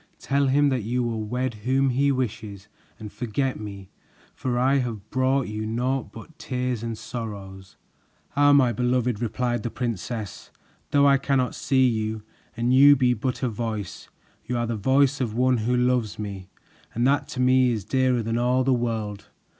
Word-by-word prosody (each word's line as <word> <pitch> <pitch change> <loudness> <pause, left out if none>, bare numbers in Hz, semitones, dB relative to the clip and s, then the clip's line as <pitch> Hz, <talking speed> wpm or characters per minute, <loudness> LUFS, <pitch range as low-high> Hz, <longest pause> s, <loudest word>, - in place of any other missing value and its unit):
Tell 140 0 0
him 145 +2 +3
that 130 -3 0
you 120 +4 -1
will 115 -2 -2
wed 125 +3 -2
whom 135 +1 +2
he 140 +3 +2
wishes 110 -6 -4 0.3
and 105 -1 -9
forget 130 +3 -2
me, 100 -3 -9 0.4
for 125 -2 -2
I 135 +3 +3
have 110 -5 -4
brought 130 0 +1
you 105 0 -4
naught 125 0 -2
but 150 +9 -13
tears 125 -5 -2
and 115 -1 -4
sorrows." 100 -5 -8 0.6
"Ah, 145 0 +5
my 130 -4 +4
beloved," 125 -1 0
replied 120 +1 -1
the 120 - -3
princess, 115 -3 -5 0.4
"though 140 0 +4
I 140 -1 +5
cannot 135 -2 0
see 130 -1 +2
you 110 -2 -2 0.3
and 120 +2 +1
you 140 +2 +8
be 125 -2 +2
but 125 +3 -3
a - - +2
voice, 110 -3 -5 0.3
you 125 - -3
are 120 - 0
the 115 0 -2
voice 135 +6 +2
of 115 -4 -2
one 125 +1 +3
who 120 +3 0
loves 125 -6 +1
me, 100 -3 -6 0.5
and 120 +2 +1
that 140 +2 +2
to 130 - -7
me 130 0 +4
is 110 -5 -3
dearer 130 0 +1
than 115 +2 -1
all 125 +2 +2
the 130 0 +2
world. 110 -4 -3
125 Hz, 180 wpm, -24 LUFS, 110-130 Hz, 0.6 s, you